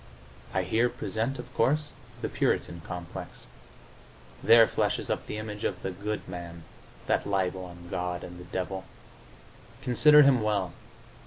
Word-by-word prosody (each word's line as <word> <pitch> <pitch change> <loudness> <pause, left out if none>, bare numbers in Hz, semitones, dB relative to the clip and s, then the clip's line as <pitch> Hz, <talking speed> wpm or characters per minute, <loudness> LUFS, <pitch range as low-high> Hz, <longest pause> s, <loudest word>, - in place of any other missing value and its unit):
I 95 - +1
here 115 +7 +2
present, 120 +2 -2
of 125 0 -9
course, 145 +5 +2 0.3
the - - +1
Puritan 85 -1 0
complex; 90 -1 -7 1.0
there 115 0 +8
flashes - - 0
up - - -2
the 105 - -4
image 105 -1 -6
of - - -2
the 95 - -2
"good 105 +4 -4
man," 85 -2 -7 0.4
that - - +1
libel 95 -2 0
on 85 -1 -11
God 90 0 -2
and 90 0 -9
the 90 - -10
devil. 95 +1 -4 1.0
Consider 150 +4 +7
him 135 -4 +5
well. 100 -5 0
100 Hz, 145 wpm, -28 LUFS, 90-115 Hz, 1.0 s, there